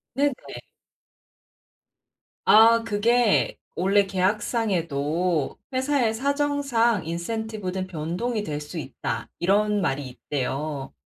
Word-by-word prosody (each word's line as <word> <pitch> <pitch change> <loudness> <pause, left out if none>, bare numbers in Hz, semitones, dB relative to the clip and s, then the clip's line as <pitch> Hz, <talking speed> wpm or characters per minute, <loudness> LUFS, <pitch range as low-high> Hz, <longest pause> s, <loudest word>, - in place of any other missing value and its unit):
네네. 285 +2 +3 2.2
아 230 +2 +7
그게 230 +1 +2 0.2
원래 195 +3 +3
계약상에도 180 - 0
'회사의 260 -3 +1
사정상 275 - +1
인센티브는 190 +2 -4
변동이 185 +8 -3
될 150 -4 -3
수 150 +4 -8
있다.' 125 -5 -4
이런 205 +3 +2
말이 135 -4 -1
있대요. 140 +2 -4
200 Hz, 200 characters per minute, -25 LUFS, 160-230 Hz, 2.2 s, 아